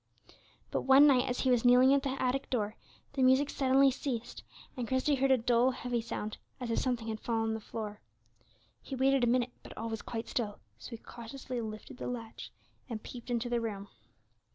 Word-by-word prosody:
But - - 0
one 270 +2 +7
night, 265 -2 +5
as 250 - -1
he 260 - +2
was 245 -2 +3
kneeling 250 +2 +6
at 280 - +3
the 270 -1 -3
attic 260 +1 0
door, 215 -3 -1 0.4
the 275 - -1
music 260 +2 +4
suddenly 270 0 +4
ceased, 250 -3 -4 0.3
and 245 -3 -3
Christie 260 +4 +1
heard 270 0 +2
a 265 - +6
dull, 240 +1 +3
heavy 245 -2 -2
sound, 215 -2 -5 0.2
as 245 -2 -3
if - - +1
something 245 -3 -1
had 220 -1 -3
fallen 225 -1 -1
on - - 0
the 220 - -3
floor. 210 -1 -6 0.8
He 270 - -6
waited 265 0 +3
a - - +4
minute, 245 +1 +2
but - - -12
all 225 +1 -3
was 225 -1 -4
quite 230 -1 -5
still; 215 -4 -2 0.2
so - - -9
he 230 - -6
cautiously 240 +2 -7
lifted 215 +2 -7
the - - -5
latch, 230 -2 -6 0.4
and 220 -3 -5
peeped 245 0 -9
into 240 0 0
the 240 -1 0
room. 205 -3 -5
245 Hz, 205 wpm, -31 LUFS, 225-260 Hz, 0.8 s, one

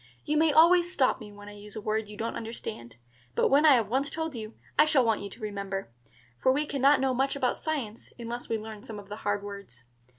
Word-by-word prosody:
You 300 - 0
may 315 0 +4
always 345 +3 +5
stop 265 -8 +2
me 210 -3 -10
when 205 0 -12
I - - -8
use 205 +1 -9
a - - -4
word 215 0 -1
you 210 - -10
don't 225 +1 -3
understand; 220 - -7 0.4
but - - +3
when 290 +3 +5
I 295 - +9
have 230 -4 +1
once 265 +6 0
told 320 +1 -3
you, 220 -1 -7 0.2
I 300 - +7
shall 285 -5 +3
want 225 -2 +1
you 200 - -6
to 215 - -13
remember; 200 - -4 0.5
for 260 - +4
we 290 +3 +1
can 280 -3 -4
not 280 +1 +6
know 265 -1 +1
much 270 +2 0
about 255 -3 0
science 260 -9 -4
unless 240 0 -6
we 225 - +1
learn 215 -1 -8
some 225 -3 -8
of 205 -1 -11
the 210 - -6
hard 205 -1 -1
words. 200 -13 -9
230 Hz, 245 wpm, -28 LUFS, 205-280 Hz, 0.5 s, I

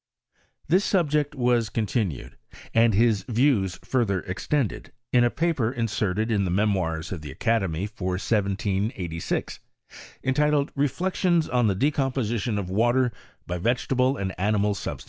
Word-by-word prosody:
This 185 +6 +3
subject 150 -7 +1
was 120 -3 +2
continued, 105 - -2 0.4
and 115 -2 +4
his 110 -2 +3
views 115 -6 +2
further 105 -8 +1
extended, 115 +6 -2 0.2
in 120 -1 +5
a 120 - +4
paper 145 -6 0
inserted 110 -3 -1
in 100 -2 +2
the 95 - -1
Memoirs 90 -4 0
of 90 -4 -5
the 75 - -8
Academy, 95 - 0
for 100 -4 -4
1 - - -1
786, 100 -4 -2 0.6
entitled, 145 +1 +2
"Reflections 170 +3 +1
on 125 -2 +2
the 100 - +1
De 140 +10 +2
csmposition 120 -6 -1
of 95 -3 -4
Water 120 +5 +2 0.3
by 90 0 -4
Vegetable 125 +5 +1
and 95 -1 -3
Animal 105 +1 +2
Sub 100 - -5
ifh!' - - -19
115 Hz, 145 wpm, -25 LUFS, 95-130 Hz, 0.6 s, in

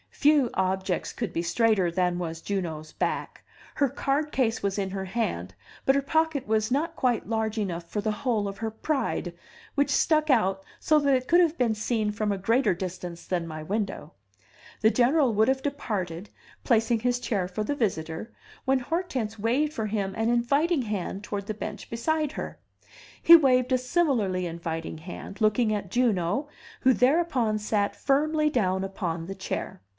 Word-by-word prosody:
Few 290 -4 +3
objects 190 -1 -1
could 230 -7 -4
be 170 - 0
straighter 195 +1 +2
than 180 0 0
was 165 -2 -4
Juno's 165 -6 -3
back; - - -3 0.3
her 280 -2 +2
card 280 +3 -1
case 245 -3 0
was 200 0 -1
in 195 -2 -2
her 190 0 -3
hand, 95 - -3 0.3
but 270 - +4
her 280 - +3
pocket 315 -2 0
was 215 0 +1
not 320 +5 0
quite 245 -3 0
large 220 0 -1
enough 175 -5 -3
for 210 - -2
the 215 - 0
whole 220 -3 -1
of 195 0 -6
her 225 0 -2
pride, 230 - -2 0.4
which 285 0 +1
stuck 310 -1 +2
out 195 -7 +2 0.2
so 310 -1 +4
that 280 -2 +3
it 255 0 -1
could 345 - +5
have 340 -2 +3
been 240 -3 +2
seen 215 0 -1
from 210 0 -1
a 200 - -1
greater 225 +1 +2
distance 180 -1 -6
than 175 -2 -2
my 155 -1 -6
window. 195 -3 -3 0.7
The 220 - +5
General 255 +1 +3
would 215 +1 +3
have 265 0 +1
departed, 205 - -3 0.3
placing 230 0 +2
his 245 +1 0
chair 205 -7 -1
for 190 +4 -3
the 285 +7 -1
visitor, 185 - -2 0.3
when 265 0 +3
Hortense 255 - -3
waved 265 +8 +1
for 220 -5 -2
him 200 -2 -2
an 225 +1 0
inviting 280 +6 +2
hand 200 -2 -4
toward 205 -1 -4
the 215 - -3
bench 210 0 -6
beside 305 +5 -1
her; - - -6 0.6
he 335 - +10
waved 255 -5 +4
a 255 - +5
similarly 250 - +1
inviting 165 -1 -4
hand, 185 +5 -9
looking 215 +1 +3
at 200 -3 -3
Juno, 240 - +1 0.3
who 260 -1 +5
thereupon 255 -5 +2
sat 210 -1 0
firmly 305 +2 +2
down 190 -7 +1
upon 175 -4 -3
the 195 +2 -6
chair. 190 - -5
220 Hz, 175 wpm, -27 LUFS, 190-265 Hz, 0.7 s, he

